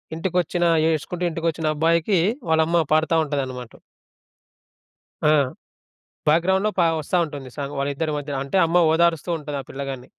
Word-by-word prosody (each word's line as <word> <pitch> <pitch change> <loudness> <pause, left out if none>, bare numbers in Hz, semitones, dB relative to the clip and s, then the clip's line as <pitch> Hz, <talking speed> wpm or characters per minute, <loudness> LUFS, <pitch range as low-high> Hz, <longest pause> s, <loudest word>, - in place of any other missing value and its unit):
ఇంటికొచ్చిన 175 0 0 0.2
ఏడుసుకుంటూ 165 +3 -2
ఇంటికొచ్చిన 160 -1 -1
అబ్బాయికి 165 +4 +2 0.3
వాళ్ళమ్మ 160 +1 +3
పాడతా 160 +1 +2
ఉంటదనమాట. 130 -5 -4 1.5
ఆ! 150 - +5 1.0
బ్యాక్‌గ్రౌండ్‌లో 190 +6 +2
పా 170 - +4
వస్తా 155 +4 -2
ఉంటుంది 145 -4 -8
సాంగ్, 140 0 -5
వాళ్ళిద్దరి 145 +3 -2
మధ్యన. 145 -1 -4
అంటే 140 +8 -3
అమ్మ 175 +1 +3
ఓదారుస్తూ 170 0 +1
ఉంటది 145 -1 -5
ఆ - - -22
పిల్లగాన్ని. 135 -2 -6
160 Hz, 125 wpm, -22 LUFS, 145-170 Hz, 1.5 s, ఆ